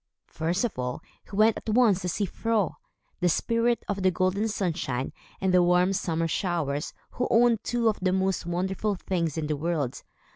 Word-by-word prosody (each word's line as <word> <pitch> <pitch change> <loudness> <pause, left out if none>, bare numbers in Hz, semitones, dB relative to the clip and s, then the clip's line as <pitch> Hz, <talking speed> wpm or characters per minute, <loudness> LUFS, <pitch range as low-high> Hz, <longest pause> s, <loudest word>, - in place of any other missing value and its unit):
First 170 +6 -1
of 225 - -2
all, 125 +4 -3 0.3
he 195 - -7
went 215 +2 +4
at - - -6
once 215 -4 +4
to 180 - -2
see 200 +4 0
Fro, 220 +2 0 0.5
the 180 -1 +2
spirit 230 +6 +1
of 200 -1 -2
the 185 - +4
golden 185 +4 0
sunshine 160 - -2 0.3
and 190 -1 +1
the 180 - +6
warm 180 +2 +3
summer 165 -3 -1
showers, 160 -5 -1 0.2
who 250 - -1
owned 230 -1 +4
two 240 -1 0
of 215 - +1
the 185 0 +2
most 190 -2 0
wonderful 190 +4 -1
things 170 -5 -2
in 160 - -1
the 150 0 -1
world. 150 -4 -2
185 Hz, 185 wpm, -27 LUFS, 165-215 Hz, 0.5 s, the